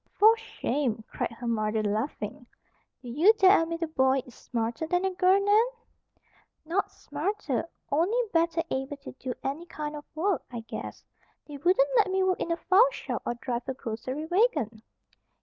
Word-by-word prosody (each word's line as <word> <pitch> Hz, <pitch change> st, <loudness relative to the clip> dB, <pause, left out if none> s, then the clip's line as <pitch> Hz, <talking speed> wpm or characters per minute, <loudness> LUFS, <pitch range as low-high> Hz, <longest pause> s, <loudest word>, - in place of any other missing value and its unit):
"For 440 Hz, +2 st, +6 dB
shame!" 270 Hz, -, -2 dB
cried -, -, -2 dB
her 235 Hz, +2 st, -9 dB
mother, 215 Hz, -1 st, 0 dB
laughing. 215 Hz, +6 st, -3 dB, 0.6 s
"Do 245 Hz, -, -7 dB
you 325 Hz, -, +5 dB
dare 385 Hz, -3 st, +6 dB
admit 330 Hz, +1 st, -2 dB
a -, -, 0 dB
boy 265 Hz, -3 st, +2 dB
is 250 Hz, -, -14 dB
smarter 235 Hz, +7 st, -3 dB
than 355 Hz, +3 st, +1 dB
a 380 Hz, -, +1 dB
girl, 370 Hz, +1 st, +4 dB
Nan?" 410 Hz, +3 st, +4 dB, 1.0 s
"Not 355 Hz, +5 st, 0 dB
smarter. 320 Hz, -, -3 dB, 0.2 s
Only 345 Hz, +11 st, +2 dB, 0.2 s
better 330 Hz, 0 st, +2 dB
able 270 Hz, +2 st, -2 dB
to 275 Hz, -, -10 dB
do 255 Hz, -1 st, -6 dB
any 295 Hz, +6 st, -3 dB
kind 300 Hz, -1 st, -5 dB
of 295 Hz, -, -8 dB
work, 350 Hz, 0 st, +1 dB
I 235 Hz, -2 st, -5 dB
guess. 225 Hz, -, -7 dB, 0.4 s
They 295 Hz, -2 st, -8 dB
wouldn't 370 Hz, -, +3 dB
let 415 Hz, -4 st, +4 dB
me 380 Hz, 0 st, +1 dB
work 370 Hz, -1 st, +1 dB
in -, -, -2 dB
the 335 Hz, -, 0 dB
file 395 Hz, +8 st, +5 dB
shop, -, -, -5 dB
or 240 Hz, -, -1 dB
drive 240 Hz, +1 st, -4 dB
a 265 Hz, -, -2 dB
grocery 255 Hz, +6 st, -5 dB
wagon." 335 Hz, -, +1 dB
310 Hz, 175 wpm, -28 LUFS, 250-375 Hz, 1.0 s, For